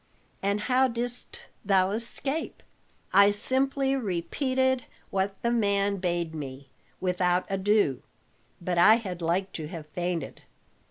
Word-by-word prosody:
"And 200 +1 0
how 260 +3 +3
didst 245 0 -4 0.2
thou 190 -1 +3
escape?" 265 +7 -3 0.5
"I 200 +1 +7
simply 270 +5 +1
repeated 260 - 0 0.3
what 195 0 -1
the 235 - +2
man 200 -3 +1
bade 175 -3 -1
me, 140 -3 -7 0.3
without 180 -1 +1
ado; 195 - +2 0.6
but 175 0 -1
I 215 +5 +8
had 185 -7 -5
like 180 +4 0
to 155 -2 -5
have 165 -2 -7
fainted. 175 -3 -3
195 Hz, 120 wpm, -27 LUFS, 175-235 Hz, 0.6 s, I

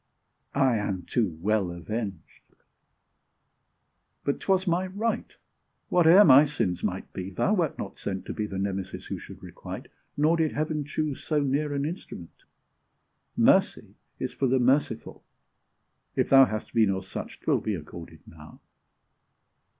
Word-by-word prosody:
I 135 -4 +3
am 100 -3 -3
too 100 -10 -1
well 105 -3 +1
avenged! 95 +2 -7 1.7
but 140 - -1
'twas 190 -1 +1
my 180 +1 +1
right; 215 +5 -3 0.5
Whate'er 180 +3 +7
my 140 0 +8
sins 90 -11 -2
might 95 -2 -3
be, 95 0 -5
thou 100 - 0
wert 170 -8 0
not 95 - -7
sent 95 -1 -4
To - - -5
be 105 -1 -3
the 95 - -6
Nemesis 95 -1 -4
who - - -5
should - - -12
requite - - -8 0.3
Nor 155 +3 +3
did 160 -2 +1
Heaven 150 -1 -2
choose 150 -1 -3
so 155 -2 +1
near 145 +2 0
an 140 0 -1
instrument. 150 - -8 0.9
Mercy - - +3 0.2
is - - -4
for 135 - 0
the 130 +1 +3
merciful! 130 +4 0 0.9
if - - +1
thou 135 0 +8
Hast 110 -3 -5
been 110 -3 +4
of 95 -1 -2
such, 95 - -7
'twill - - +1
be 105 - -2
accorded 80 0 -10
now. 80 -1 -14
120 Hz, 145 wpm, -27 LUFS, 95-150 Hz, 1.7 s, my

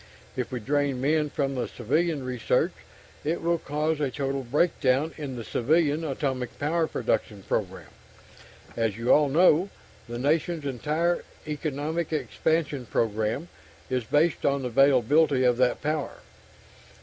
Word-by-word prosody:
If 125 -2 -3
we 125 - -3
drain 140 +2 0
men 150 +3 +1
from 140 -1 -1
civilian 145 +4 -1
research, 125 -3 +1 0.5
it 160 +3 -1
will 170 0 0
cause 150 +2 -1
a 145 -2 0
total 135 +1 -2
breakdown 140 +1 +1
in 140 -4 -5
the 120 - -5
civilian 150 +6 +1
atomic 135 -4 -3
power 160 +3 0
production 110 -6 -2
program. - - -3 0.9
As 115 -3 0
you 115 +2 +3
all 150 -1 +4
know, 170 +4 +4 0.4
the 120 - -4
nation's 155 +4 0
entire 155 +6 0 0.2
economic 155 +2 -3
expansion 155 -4 -1
program 110 +7 -1 0.4
is 130 -1 0
based 150 +8 +1
on 140 -1 +1
the 125 - -2
availability 135 +2 +4
of 125 -1 +3
that 125 -1 +1
power. 150 -1 -2
145 Hz, 135 wpm, -26 LUFS, 125-155 Hz, 0.9 s, all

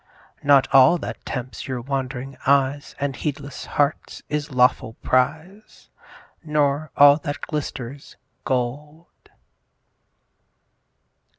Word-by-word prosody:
Not 140 -2 +4
all 135 +6 +7
that - - -7
tempts 125 -1 -5
your 130 -2 -3
wand'ring 135 0 -4
eyes 140 +1 +1
And 140 -1 -2
heedless 140 -1 -5
hearts, 145 +1 -1
is 150 0 -2
lawful 125 -4 +2
prize; 155 +11 -2 0.5
Nor 150 -1 0
all 145 0 +8
that 145 -1 -5
glisters, 140 -3 -6 0.3
gold. 145 +6 -3
140 Hz, 95 wpm, -22 LUFS, 130-150 Hz, 0.5 s, all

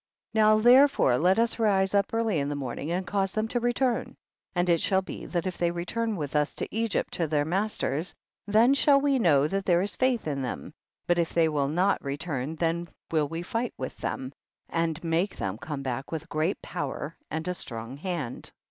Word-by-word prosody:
1 220 -1 +2
0. - - +6
Now 215 0 +6
therefore 245 - +5
let 180 +4 +4
us 230 0 +1
rise 195 -3 +2
up 200 -1 +2
early 225 -7 +1
in 140 0 -1
the 145 - -2
morning 140 +2 -4
and 180 +2 -1
cause 195 -1 0
them 215 0 0
to 245 - 0
return, 240 +1 0 0.4
and 175 0 +1
it 170 -2 +3
shall 190 -1 +2
be - - -7
that 175 -1 -2
if 185 -1 -4
they 175 - +2
return 215 +6 -2
with 150 -5 -4
us 150 0 +1
to - - -4
Egypt 225 -2 -1
to 165 - 0
their 145 -1 +1
mas 195 +7 -1
ters, 160 +6 -2 0.3
then 225 +6 +5
shall 280 0 +5
we 275 -1 +2
know 150 - +4
that 195 +4 -1
there 175 0 +3
is 205 - -3
faith 255 -3 +1
in 140 -3 -2
them, 125 - -5 0.3
but 175 0 +2
if 170 - -1
they 165 -1 +4
will 145 -3 0
not 180 +6 +1
return, 140 0 -3
then 170 +1 -1 0.2
will 155 -3 +2
we 165 +3 -5
fight 230 +6 -2
with 130 - -5
them, 130 +1 -4 0.4
and 165 0 -1
make 170 +4 0
them 95 0 -3
come 145 -1 -5
back 135 +1 -4
with 160 -1 -4
great 155 +5 0
power 145 +2 -4
and 160 +2 -3
a 180 - 0
strong 115 -6 -7
hand. 150 -5 -4
175 Hz, 215 wpm, -27 LUFS, 150-215 Hz, 0.4 s, 0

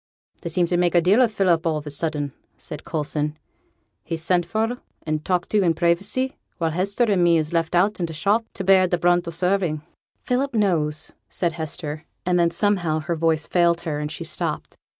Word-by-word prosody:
'They 170 - -4
seem 175 +2 +2
to 175 +1 0
make 175 0 +2
a - - +7
deal 190 +8 +4
o' 250 - +6
Philip 185 -6 +1
all 165 -3 +1
on 150 - -3
a 150 - -4
sudden,' 145 -2 -1 0.2
said 150 - -8
Coulson. 150 -1 -2 0.7
'He's 165 -1 -4
sent 175 0 +1
for, 225 +6 -1 0.3
and 155 -1 -2
talked 180 0 -1
to 210 -2 +3
i' 170 - +4
privacy, 195 - 0 0.2
while 165 -1 0
Hester 195 +7 0
and 200 -6 +2
me 170 -1 +5
is 155 +1 -2
left 165 0 0
i' 180 +3 +5
t' 180 -6 -4
shop 200 +8 +1
for - - -47
t' 195 - -4
bear 190 -1 +5
t' 175 - +1
brunt 175 0 +2
o' - - -1
t' 165 - -6
serving.' 180 -4 0 0.4
'Philip 255 +1 0
knows,' 160 -8 0 0.2
said 170 -2 -1
Hester, 155 -1 -5 0.2
and 180 0 +2
then, 170 -1 +4
somehow, 175 -5 +1
her 170 +2 -2
voice 160 -1 +1
failed 170 -1 +2
her 155 -4 -3
and 150 0 -3
she - - -5
stopped. - - -3
170 Hz, 210 wpm, -23 LUFS, 160-190 Hz, 0.7 s, a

